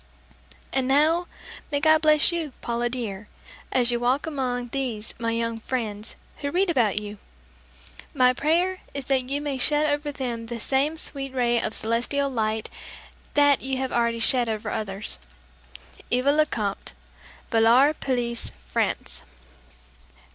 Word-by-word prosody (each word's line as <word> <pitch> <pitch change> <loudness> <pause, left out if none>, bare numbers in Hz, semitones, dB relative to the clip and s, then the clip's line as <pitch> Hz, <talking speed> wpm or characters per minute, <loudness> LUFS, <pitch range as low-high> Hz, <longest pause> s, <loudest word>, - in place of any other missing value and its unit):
And 265 -1 +1
now, 315 +6 +3 0.4
may 285 - +1
God 315 +1 +5
bless 305 0 +5
you, 325 -5 -2
Paula 240 0 -1
dear, 220 -5 -5 0.4
as 245 -1 +3
you 240 - 0
walk 250 +4 +1
among 250 -5 -2
these 235 -5 -3
my 230 -1 -1
young 230 0 -1
friends 220 -3 -3 0.2
who 285 - -3
read 360 +4 +2
about 225 - +2
you! 210 -1 -8 0.9
My 255 -2 +4
prayer 345 +7 +1 0.2
is 280 -2 -3
that 260 -1 +1
you 280 +1 0
may 285 -3 -3
shed 295 +3 +3
over 290 0 0
them 240 -5 -4
the 235 0 -5
same 280 +7 +1
sweet 275 -3 -3
ray 240 -2 +2
of 220 - -2
celestial 240 +5 0
light 220 -2 -1 0.7
that 285 -1 +5
you 265 0 -2
have 265 0 -2
already 235 -1 +1
shed 240 +1 +2
over 215 -1 -3
others. 195 - -3 0.9
EVA 255 +3 +3
LECOMTE. 235 -10 -1 0.6
Villar 235 +6 +5
Pellice, 240 -5 -2
France. - - -2
255 Hz, 140 wpm, -25 LUFS, 230-285 Hz, 0.9 s, God